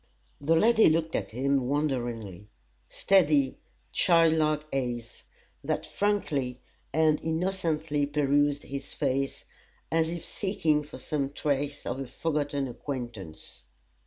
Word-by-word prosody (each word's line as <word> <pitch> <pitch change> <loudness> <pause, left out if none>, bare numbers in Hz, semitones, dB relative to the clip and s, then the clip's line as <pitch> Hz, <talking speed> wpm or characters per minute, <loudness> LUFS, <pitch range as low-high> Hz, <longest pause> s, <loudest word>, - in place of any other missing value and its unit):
The 160 +3 +3
lady 225 +4 +6
looked 160 0 0
at 100 - -2
him 135 +2 0
wonderingly 120 - -2 0.4
steady, 150 -8 +3 0.3
child 165 -2 +4
like 155 -1 +1
eyes, 120 -3 -3 0.4
that - - -1
frankly 145 -12 -1 0.3
and 155 0 +3
innocently 160 -3 0
perused 145 0 +2
his 140 0 -7
face, 135 -1 -1 0.5
as 160 0 +2
if 170 0 -5
seeking 160 -7 0
for 150 - -10
some 140 -3 -2
trace 145 0 -2
of 130 - -3
a 135 - -4
forgotten 145 0 -1
acquaintance. 120 - -7
145 Hz, 115 wpm, -28 LUFS, 135-160 Hz, 0.5 s, lady